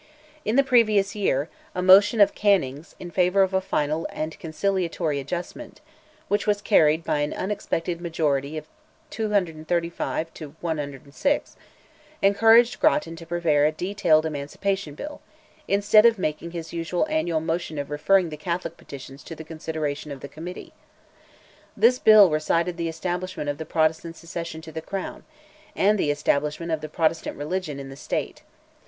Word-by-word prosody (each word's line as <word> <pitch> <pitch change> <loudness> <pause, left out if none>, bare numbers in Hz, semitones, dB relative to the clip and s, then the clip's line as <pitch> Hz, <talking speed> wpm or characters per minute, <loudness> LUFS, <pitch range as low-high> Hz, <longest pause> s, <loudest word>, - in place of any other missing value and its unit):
In 215 - 0
the 275 - +5
previous 215 -7 +3
year, 155 -9 0 0.3
a 180 - -1
motion 200 +4 +7
of 200 - +6
Canning's, 165 -7 0
in 175 - -8
favour 180 +2 +3
of 190 0 -1
"a 190 - +2
final 155 -2 -1
and 155 +1 -5
conciliatory 170 -3 -1
adjustment," 175 - -6 0.5
which 205 - 0
was 205 -1 +2
carried 160 -6 +3
by 150 - 0
an 145 0 -1
unexpected 175 -3 -3
majority 155 -3 -1
of 155 - -6 0.5
235 170 - -1
to 155 -2 -10
106, 150 - -2 0.7
encouraged 225 +4 +5
Grattan 300 - +2
to 165 0 -11
prepare 160 -4 +2
a - - +1
detailed 170 -2 +1
Emancipation 155 +3 -3
Bill, 295 - -8 0.5
instead 210 +2 +5
of 230 -2 +2
making 160 -1 -3
his 165 -1 -7
usual 170 - -1
annual 305 - 0
motion 160 -1 -3
of 145 0 -4
referring 180 +4 +3
the 150 - -7
Catholic 170 +1 -4
petitions 135 0 -11
to 165 - -7
the 160 - -9
consideration 155 -2 -4
of 135 -2 -8
the - - -7
Committee. 170 +5 -9 1.0
This 250 +2 +4
bill 210 -5 +7
recited 165 +3 0
the 170 -1 -2
establishment 175 -1 -3
of 145 - -9
the 160 - -6
Protestant 160 +1 0
succession 165 -1 -6
to 160 0 -10
the 160 +1 -5
crown, 195 +3 -6 0.5
and 205 +1 +3
the 150 - +1
establishment 150 +3 0
of 160 -1 -1
the 155 - -6
Protestant 160 +1 -1
religion 150 -1 -3
in 135 0 -8
the 135 - -9
State. - - -4
165 Hz, 155 wpm, -24 LUFS, 155-195 Hz, 1.0 s, motion